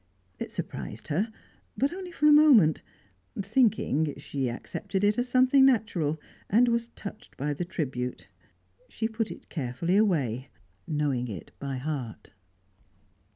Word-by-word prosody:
It - - -4
surprised - - -6
her, 200 +10 0 0.5
but 275 +5 +1
only 365 -1 -7
for 300 - -1
a 300 - +8
moment; 275 - +6 0.6
thinking, 195 - +2
she 140 -2 -3
accepted 190 +10 -4
it 205 +3 +3
as 245 +1 -1
something 255 +2 +5
natural, 205 - +2 0.3
and 235 +5 +5
was 235 0 0
touched 210 +1 -9
by 145 +2 -1
the 160 +5 -3
tribute. 130 -8 -4 0.6
She 225 - -2
put 225 -1 -2
it - - -10
carefully 155 +5 -1
away 145 - +1 0.4
knowing 145 -6 0
it 95 -9 -8
by 140 -1 -4
heart. 130 -4 -5
175 Hz, 135 wpm, -28 LUFS, 140-235 Hz, 0.6 s, a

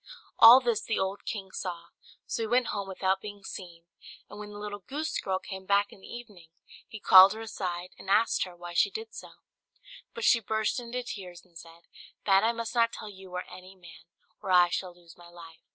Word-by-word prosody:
All 235 +3 +10
this 235 -4 0
the 225 - -2
old 190 +1 -3
king 195 -4 -5
saw: 170 -3 -6 0.4
so - - -3
he 225 - -1
went 245 +2 +1
home 200 -2 -4
without 190 0 -1
being 205 -1 -9
seen; 175 -4 -9 0.4
and - - -11
when 210 0 -8
the 205 - -10
little 205 0 -6
goose 295 +10 -5
girl 190 -1 -1
came 190 0 -9
back 200 0 +2
in 195 - -17
the - - -13
evening, 210 -8 -11 0.4
he 220 - -10
called 190 0 +8
her 220 - -8
aside, 180 -5 -5
and 195 - -10
asked 215 +3 +3
her 180 -2 -9
why 175 0 -9
she 175 - +3
did 445 +2 -8
so: - - -9 0.9
but 230 - -6
she 235 - +5
burst 220 +2 -1
into 245 +1 -5
tears, 180 -7 -9
and 170 - -29
said, 165 0 -13 0.4
"That 195 0 +4
I 225 - +3
must 230 0 -5
not 230 -1 +3
tell 215 - -8
you 190 -1 -13
or 180 - -3
any 185 +1 -13
man, 175 -3 -15 0.4
or - - -7
I 180 -1 +5
shall 180 0 -4
lose 170 -2 -18
my 175 - -14
life." 165 -2 -14
195 Hz, 215 wpm, -28 LUFS, 180-225 Hz, 0.9 s, All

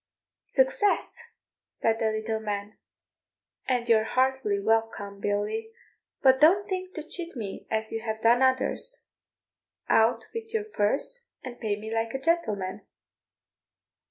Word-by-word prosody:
"Success," 480 -2 +2 0.5
said 225 0 +1
the 220 -1 +1
little 220 0 -2
man; 205 -1 -4 0.9
"and 245 -2 0
you're 220 -2 +5
heartily 255 -4 +1
welcome, 215 -2 0
Billy; 205 - -1 0.5
but 260 0 +6
don't 385 +6 +6
think 370 -1 -4
to 315 - -4
cheat 335 +1 -3
me 210 -5 -6
as 220 0 -1
you 225 - -3
have 220 -1 -3
done 235 +3 +4
others, 260 0 +1 0.8
out 225 +2 +4
with 455 0 -6
your 440 - +1
purse 435 - -1 0.2
and 250 -2 -8
pay 215 -3 0
me 220 +1 -6
like 225 +2 -1
a - - -1
gentleman." 215 - 0
230 Hz, 130 wpm, -27 LUFS, 220-335 Hz, 0.9 s, but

